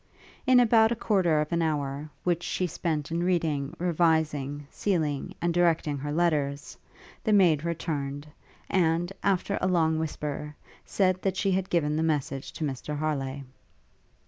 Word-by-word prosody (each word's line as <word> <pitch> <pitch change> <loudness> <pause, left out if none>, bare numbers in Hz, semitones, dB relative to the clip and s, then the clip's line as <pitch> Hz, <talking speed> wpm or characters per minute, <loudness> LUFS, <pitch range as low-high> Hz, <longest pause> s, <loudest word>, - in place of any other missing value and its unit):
In 255 -1 +7
about 225 -2 +5
a - - +1
quarter 185 -8 +2
of 150 - -4
an 170 - +1
hour, 145 -2 -2
which 175 -1 +1
she 180 - -1
spent 160 -3 -2
in 170 +1 0
reading, 160 -4 0
revising, 160 -4 +1
sealing, 155 -8 -1
and 170 0 0
directing 165 -4 +2
her 145 +2 -4
letters, 150 -3 0 0.5
the 220 - +1
maid 170 -7 +4
returned; 145 -4 -3 0.4
and, 175 0 +1
after 200 0 0
a - - +2
long 160 -3 +2
whisper, 150 -1 -4 0.3
said, 185 -2 +1
that 190 -1 -1
she 195 -1 +1
had 190 0 0
given 150 -3 +1
the - - +1
message 145 -4 -1
to - - -5
Mr 145 +1 -3
Harleigh. 140 -3 -2
160 Hz, 150 wpm, -27 LUFS, 145-175 Hz, 0.5 s, In